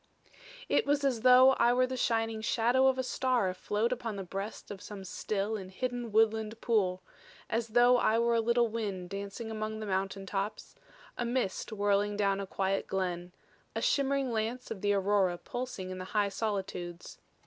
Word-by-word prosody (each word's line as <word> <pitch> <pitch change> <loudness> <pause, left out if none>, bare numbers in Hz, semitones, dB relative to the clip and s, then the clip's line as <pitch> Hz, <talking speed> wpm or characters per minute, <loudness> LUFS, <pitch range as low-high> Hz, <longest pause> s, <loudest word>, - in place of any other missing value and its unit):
"It - - +2
was 285 0 +2
as 255 -5 +1
though 255 +1 +8
I 240 +1 +5
were 255 +1 +3
the 260 0 -4
shining 225 -2 0
shadow 240 +4 +3
of 265 -1 +3
a 260 - 0
star 250 -5 +1
afloat 210 +5 -1
upon 235 -4 -3
the 195 - -4
breast 195 +4 -6
of 200 -1 -7
some 205 -2 -8
still 205 +3 -2
and 190 -3 -6
hidden 245 +3 -4
woodland 220 0 +2
pool; 190 -6 +1 0.5
as 230 +1 0
though 245 +2 +5
I 225 -2 +3
were 235 0 +2
a 230 - +3
little 235 +1 +3
wind 200 -5 -4
dancing 200 +3 -5
among 215 0 -4
the 215 - -4
mountain 195 0 -2
tops; 200 +2 -4 0.5
a - - +1
mist 240 -4 -2
whirling 205 0 +1
down 200 -1 +1
a 195 - -4
quiet 195 0 -1
glen; 180 -2 -2 0.4
a - - -1
shimmering 275 -2 +1
lance 230 +3 -2
of 205 -4 -5
the 205 - +2
aurora 195 -2 +2
pulsing 245 -5 -5
in 185 - -6
the 185 - -5
high 205 -1 +3
solitudes. 190 -5 -4
215 Hz, 180 wpm, -31 LUFS, 195-240 Hz, 0.5 s, though